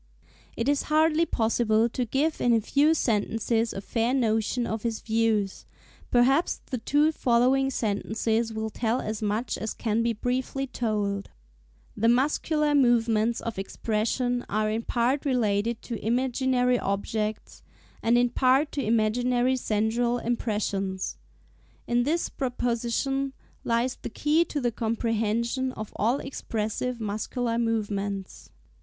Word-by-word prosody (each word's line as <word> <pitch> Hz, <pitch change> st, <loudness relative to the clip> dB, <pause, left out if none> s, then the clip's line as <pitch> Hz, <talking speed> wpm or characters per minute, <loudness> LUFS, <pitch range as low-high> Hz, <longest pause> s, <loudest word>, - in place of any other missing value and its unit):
It 230 Hz, -, -1 dB
is 285 Hz, 0 st, +2 dB
hardly 315 Hz, +2 st, +3 dB
possible 225 Hz, -1 st, +2 dB
to 245 Hz, +1 st, -2 dB
give 290 Hz, +7 st, 0 dB
in 240 Hz, -, +4 dB
a 230 Hz, -, +4 dB
few 290 Hz, +8 st, +3 dB
sentences 225 Hz, -1 st, 0 dB
a 195 Hz, -, -5 dB
fair 230 Hz, +5 st, 0 dB
notion 230 Hz, 0 st, +1 dB
of 220 Hz, -1 st, -3 dB
his 230 Hz, -1 st, -2 dB
views; 220 Hz, -3 st, 0 dB, 0.4 s
perhaps 265 Hz, +7 st, +3 dB
the 255 Hz, -, -1 dB
two 295 Hz, +6 st, +3 dB
following 260 Hz, 0 st, +2 dB
sentences 225 Hz, 0 st, -1 dB
will 220 Hz, 0 st, -3 dB
tell 230 Hz, +3 st, 0 dB
as 215 Hz, 0 st, -4 dB
much 215 Hz, +3 st, -1 dB
as 220 Hz, -, -4 dB
can 225 Hz, -1 st, 0 dB
be 235 Hz, 0 st, +1 dB
briefly 255 Hz, +4 st, -2 dB
told: 210 Hz, -6 st, -2 dB, 0.7 s
"the 220 Hz, +2 st, +1 dB
muscular 295 Hz, +4 st, +2 dB
movements 235 Hz, -4 st, +3 dB
of 230 Hz, -4 st, -4 dB
expression 235 Hz, +5 st, -1 dB
are 215 Hz, +1 st, 0 dB
in 220 Hz, +1 st, -1 dB
part 245 Hz, +4 st, 0 dB
related 230 Hz, -4 st, 0 dB
to 235 Hz, -3 st, -6 dB
imaginary 250 Hz, +1 st, +1 dB
objects, 210 Hz, +2 st, -3 dB, 0.4 s
and 230 Hz, +1 st, +3 dB
in 245 Hz, 0 st, +3 dB
part 265 Hz, +4 st, +3 dB
to 280 Hz, -, -2 dB
imaginary 245 Hz, +3 st, +2 dB
sensorial 235 Hz, +1 st, 0 dB
impressions. 205 Hz, -5 st, -2 dB, 0.7 s
In 240 Hz, 0 st, +2 dB
this 330 Hz, +4 st, 0 dB
proposition 250 Hz, +2 st, -1 dB, 0.3 s
lies 235 Hz, +2 st, 0 dB
the -, -, -5 dB
key 300 Hz, +8 st, +2 dB
to 300 Hz, -, -3 dB
the 245 Hz, -3 st, 0 dB
comprehension 230 Hz, +3 st, -1 dB
of 215 Hz, -1 st, -7 dB
all 240 Hz, +6 st, +1 dB
expressive 235 Hz, -1 st, -3 dB
muscular 230 Hz, +2 st, -2 dB
movements." 205 Hz, -4 st, -2 dB
(s. -, -, -30 dB
235 Hz, 135 wpm, -26 LUFS, 220-255 Hz, 0.7 s, in